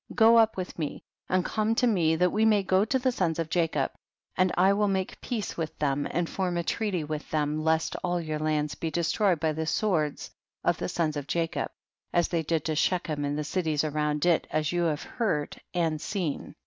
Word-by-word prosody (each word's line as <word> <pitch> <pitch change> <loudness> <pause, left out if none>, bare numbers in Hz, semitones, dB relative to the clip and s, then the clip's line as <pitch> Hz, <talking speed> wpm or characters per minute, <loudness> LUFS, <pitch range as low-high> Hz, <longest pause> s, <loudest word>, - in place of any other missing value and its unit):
Go 230 0 +7
up 220 -2 +3
with 180 -1 -5
me, 150 -3 -4 0.3
and 185 0 +2
come 220 +1 0
to 250 - +3
me 170 -9 +3
that 180 +2 +2
we 215 - +1
may 215 -2 +4
go 190 +1 +3
to 245 +5 +1
the 255 0 +1
sons 170 -8 0
of 165 -1 -3
Jacob, 165 -5 +1 0.4
and 185 0 +3
I 190 +2 +5
will 205 +1 +2
make 190 -1 -2
peace 225 -6 -3
with 160 -2 -4
them, 145 -1 0
and 175 0 -1
form 180 -1 -2
a 170 - 0
treaty 195 -2 -1
loith 150 0 -5
them, 150 0 0
lest 160 0 +1
all 175 0 0
your 155 -2 -3
lands 150 -1 0
be 160 +2 -3
destroyed 170 +2 +1
by 160 0 +1
the 160 +1 -3
swords 160 -6 0 0.3
of - - +1
the - - -2
sons 155 -3 0
of 145 -1 -5
Jacob, 165 -1 -1 0.4
as 175 -1 +2
they 170 -2 0
did 160 -1 -1
to 155 - 0
Shechem 155 -2 0
and 145 +1 -1
the 150 - -1
cities 155 -1 0
around 150 0 0
it, 175 -2 +3
as 155 -1 0
you 175 -1 +1
have 150 -3 -1
heard 175 -12 -2
and 165 -4 0
seen. 180 -8 -3
165 Hz, 215 wpm, -28 LUFS, 155-190 Hz, 0.4 s, Go